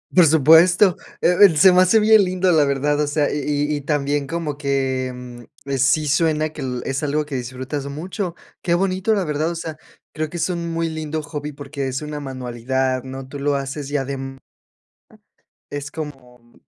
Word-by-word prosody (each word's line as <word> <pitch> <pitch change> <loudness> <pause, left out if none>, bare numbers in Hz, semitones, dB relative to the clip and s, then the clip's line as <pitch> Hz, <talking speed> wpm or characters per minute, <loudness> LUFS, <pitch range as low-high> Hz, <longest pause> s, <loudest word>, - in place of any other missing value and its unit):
Por 180 -2 +7
supuesto. 165 +5 +6 0.3
Eh 180 - +3
eh, 175 -7 +7
se 190 +4 +7
me 180 +1 +5
hace 200 +5 +5
bien 215 -1 +6
lindo, 185 0 +1
la 155 -3 +4
verdad, 145 +1 0
o 150 - 0
sea, 145 0 0
y 145 - -1
y 145 0 0
y - - -6
también 145 -1 -1
como 165 -3 -3
que, 135 -2 -1
em, 125 -1 -10 0.2
eh, 140 -1 -2
sí 150 +3 +2
suena 155 +1 +1
que - - -9
l 125 -2 -3
es 135 +2 -2
algo 150 +1 0
que 145 -2 -6
disfrutas 130 +3 -5
mucho. 175 +5 -5 0.3
¡Qué 170 - 0
bonito! 190 +4 +1
La 200 - +1
verdad, 150 +1 -1
o - - -5
sea, 160 -2 -6 0.4
creo 155 0 -3
que 175 - -7
es 170 +2 -1
un 170 -1 -3
muy 165 0 -1
lindo 155 -1 -4
hobby 150 0 -6
porque 140 -1 -5
es 130 +2 -3
una 150 0 -5
manualidad, 130 -1 -2
¿no? 130 0 -8
Tú 140 +1 -8
lo 145 +1 0
haces 140 +1 -4
y 145 - +1
adem 135 -1 -5 1.3
es 145 -1 -5
como 125 -6 -10
145 Hz, 200 wpm, -21 LUFS, 135-165 Hz, 1.3 s, Por